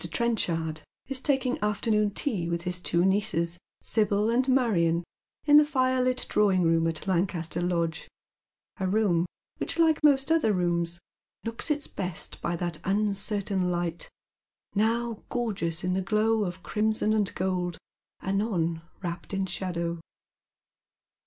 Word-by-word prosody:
Trenchard 165 -9 0 0.3
is 270 -1 +1
taking 265 -2 +1
afternoon 210 0 +1
tea 195 -6 -1
with 170 0 -2
his 180 0 0
two 170 -1 +1
niooes, 175 -3 +1 0.2
Sibyl 210 0 +2
and 255 +3 +2
Marion, 175 -10 +2 0.4
in 295 -1 +7
the 300 - +8
firelit 255 -3 +1
drawing 195 -4 +3
room 165 0 +3
at 165 -1 -3
Lancaster 175 -3 0
Lodge 170 -2 -1 0.7
a 190 - 0
room 185 -4 +2 0.3
which, - - -3
like 320 -2 +3
most 280 0 +4
other 310 -10 +3
rooms, 175 -2 0 0.5
looks 230 +6 -4
its 295 -1 0
best 180 -3 -3
by 170 - -1
that 170 -2 -3
un 205 +2 +1
certain 195 -2 0
light, 175 -1 -3 0.6
now 230 +2 0
gorgeous 190 -9 -2
in 180 0 0
the 190 - 0
glow 215 +2 +2
of 180 0 -6
crimson 215 0 +1
and 210 -3 0
gold, 180 -2 -1 0.5
anon 190 -5 0 0.2
wrapped 170 +2 -4
in 195 0 0
shadow. 170 -2 -3
195 Hz, 135 wpm, -27 LUFS, 170-225 Hz, 0.7 s, the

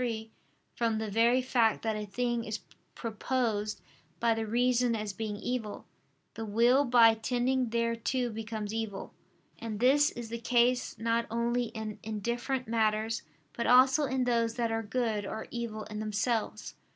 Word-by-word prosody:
3), 225 -2 -3 0.4
from 230 -2 0
the 220 -1 -3
very 235 +4 +3
fact 235 -3 +2
that 220 -1 0
a 210 0 -4
thing 240 +2 -1
is 215 -1 -4 0.3
proposed 220 -2 -2 0.4
by 230 -1 +3
the 225 0 -3
reason 245 +1 +2
as 210 -2 -3
being 215 0 -4
evil, 225 -2 -4 0.5
the 225 - -6
will 235 +6 +4
by 235 -2 +6
tending 245 +2 0
thereto 235 +2 0
becomes 220 -1 -5
evil. 220 -3 -4 0.5
And 220 -2 -5
this 285 +5 +5
is 235 -2 -7
the 235 +1 -4
case 245 +1 +2
not 230 +1 0
only 235 +2 0
in 220 -2 -6
indifferent 235 +5 -3
matters, 220 0 +1 0.3
but 235 - -2
also 260 +4 +6
in 260 -1 0
those 230 -2 +1
that 235 -2 0
are 225 0 0
good 225 -1 -1
or 220 +2 -5
evil 230 -3 -4
in 210 0 -7
themselves. 215 +1 -2
230 Hz, 155 wpm, -30 LUFS, 220-245 Hz, 0.5 s, by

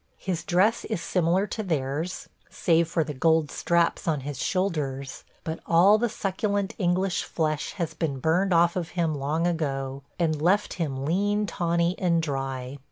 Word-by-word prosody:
His 175 -4 -3
dress 185 +7 +2
is 215 -5 -2
similar 175 +3 +1
to 215 +2 -4
theirs, 160 -1 -2 0.2
save 165 -1 +2
for 165 0 +1
the 150 0 -5
gold 160 +2 +2
straps 170 0 +1
on 155 -4 +1
his 145 0 -5
shoulders, 150 -8 -2 0.2
but 160 0 -4
all 190 +6 +6
the 240 +1 +1
succulent 200 +1 -1
English 185 0 +1
flesh 155 -2 -2
has 170 -5 -3
been 150 -5 -2
burned 170 +8 +1
off 170 0 +4
of 175 -3 -2
him 165 -2 +1
long 150 +4 -1
ago, 140 -5 -2 0.2
and 155 -3 0
left 195 +5 +2
him 140 -6 -3
lean, 205 +6 +1
tawny, 170 -2 0
and 170 -3 +2
dry. 135 -2 -4
165 Hz, 165 wpm, -26 LUFS, 150-185 Hz, 0.2 s, all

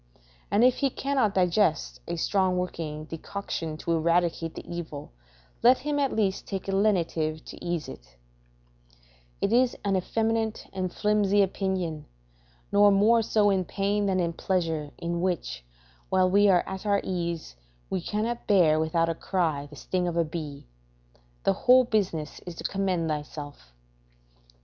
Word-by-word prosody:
If 245 +4 +4
he 275 - +1
cannot 265 -6 0
digest 180 -3 +1
a 170 - -2
strong 185 +2 +1
working 160 -4 -4
decoction 165 -1 -5
to 170 - -3
eradicate 165 0 +1
the - - -9
evil, 160 - -6 0.5
let 250 +2 +6
him 290 +2 -2
at 275 -2 +1
least 195 -3 -1
take 195 -2 -4
a - - -1
lenitive 170 -6 0
to - - -10
ease 175 -3 -2
it: - - -12 1.2
["It 200 - +1
is 250 +1 +3
an 200 -1 +2
effeminate 225 +3 -1
and 185 -2 -2
flimsy 205 -1 +2
opinion, 185 -5 -2 0.6
nor 205 0 +6
more 215 +4 +4
so 210 -2 +3
in 190 -1 +1
pain 200 +3 -1
than 190 -1 +1
in 170 -1 0
pleasure, 165 -5 -1
in 170 0 -3
which, 175 - -2 0.5
while 185 -1 +3
we 205 +1 +5
are 180 -2 +3
at 190 0 -5
our 200 -1 +2
ease, 170 - -3 0.4
we 185 - -1
cannot 220 +6 -3
bear 170 -7 +4
without 165 +1 +1
a 165 - 0
cry 160 -5 -1
the 145 - -13
sting 180 +5 -2
of 170 -1 -2
a 170 - +3
bee. 150 -3 -6 0.8
The - - +3
whole 255 +1 +5
business 195 -10 -1
is 175 - -6
to - - -8
commend 190 -4 0
thyself." 145 - -6
185 Hz, 155 wpm, -27 LUFS, 165-205 Hz, 1.2 s, let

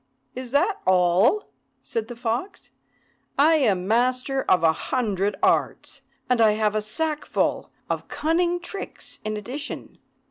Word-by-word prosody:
"Is 255 -1 -6
that 350 - +1
all?" 185 - +3 0.3
said 225 -1 -3
the 240 - -8
fox. 240 - -4 0.7
"I 315 +3 +5
am 195 -10 +1
master 255 +4 +1
of 180 -3 +4
a 160 -1 +5
hundred 205 -2 -1
arts, - - 0 0.3
and 250 -2 +2
I 215 -1 +6
have 215 -1 +1
a 215 - 0
sackful 300 +8 -1 0.2
of - - -3
cunning 345 +3 0
tricks 390 +2 -7
in 215 0 -3
addition. 265 +8 -7
245 Hz, 135 wpm, -24 LUFS, 210-300 Hz, 0.7 s, I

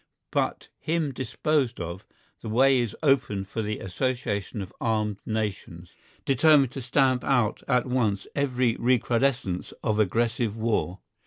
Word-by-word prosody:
But - - -1
him 160 -3 -1
disposed 130 +1 -1
of, 85 +1 -6 0.3
the 110 - -6
way 130 +4 +4
is 120 -4 -2
open 130 -9 +2
for 110 +3 -4
the 105 0 -2
association 105 0 -2
of 95 - -12
armed 105 -3 0
nations, 100 -6 -4 0.3
determined 140 -1 +4
to 135 - -6
stamp 130 +1 +2
out 120 -6 +1
at 125 -2 +2
once 115 -6 0
every 130 -4 +1
recrudescence 120 -5 +1
of 110 -2 0
aggressive 115 +1 +1
war. 110 -5 -1
120 Hz, 135 wpm, -26 LUFS, 105-130 Hz, 0.3 s, way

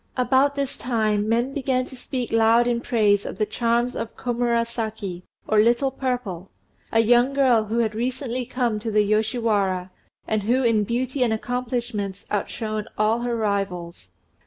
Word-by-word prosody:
About 265 +3 +3
this 280 -2 -3
time 215 -3 0
men 240 +4 +1
began 260 -2 0
to 260 - -11
speak 250 -1 -4
loud 225 +1 +4
in 240 -1 0
praise 210 -4 +2
of - - -6
the 215 - +1
charms 235 +2 0
of 230 - -5
Komurasaki, 230 -5 -2 0.3
or 215 - +3
"Little 240 +5 +3
Purple," 245 -9 -3 0.4
a 225 - +4
young 240 +4 +4
girl 250 -6 +4
who 220 +2 -2
had 225 -2 +1
recently 250 +2 -2
come 240 -3 -1
to 225 +2 -4
the 210 -1 +3
Yoshiwara, 210 -4 0 0.4
and 215 -1 0
who 245 +6 +1
in 220 -3 +3
beauty 255 +4 -2
and 240 -2 +3
accomplishments 225 -4 -3
outshone 215 +1 -2
all 215 +2 +2
her 240 0 -1
rivals. 185 - -3
230 Hz, 160 wpm, -23 LUFS, 215-245 Hz, 0.4 s, loud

